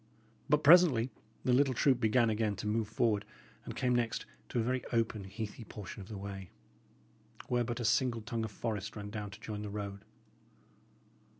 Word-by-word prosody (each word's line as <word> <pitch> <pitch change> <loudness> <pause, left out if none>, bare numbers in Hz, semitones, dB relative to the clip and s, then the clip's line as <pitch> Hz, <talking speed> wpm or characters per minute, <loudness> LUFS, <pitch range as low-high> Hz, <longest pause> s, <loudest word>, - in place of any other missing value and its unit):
But 150 +1 +4
presently 145 -7 +7 0.3
the 125 - +4
little 135 0 +4
troop 130 +2 +4
began 115 0 +3
again 105 -1 0
to - - -6
move 110 +1 0
forward, 110 -2 +1 0.4
and - - -7
came 125 -1 +1
next 120 -2 0 0.2
to - - -3
a 115 - +3
very 130 +2 0
open, 115 -4 0
heathy 105 +3 -6
portion 105 -1 -8
of 95 - -10
the 105 - -6
way, 95 -2 -6 1.0
where 120 -1 +2
but 120 +1 -3
a 120 - -2
single 115 +1 +2
tongue 115 0 -2
of 110 - -3
forest 105 -1 -3
ran 105 -1 -6
down 105 -1 -4
to 100 +1 -11
join 105 -2 -5
the 105 - -4
road. 100 -1 -5
110 Hz, 185 wpm, -33 LUFS, 105-120 Hz, 1.0 s, presently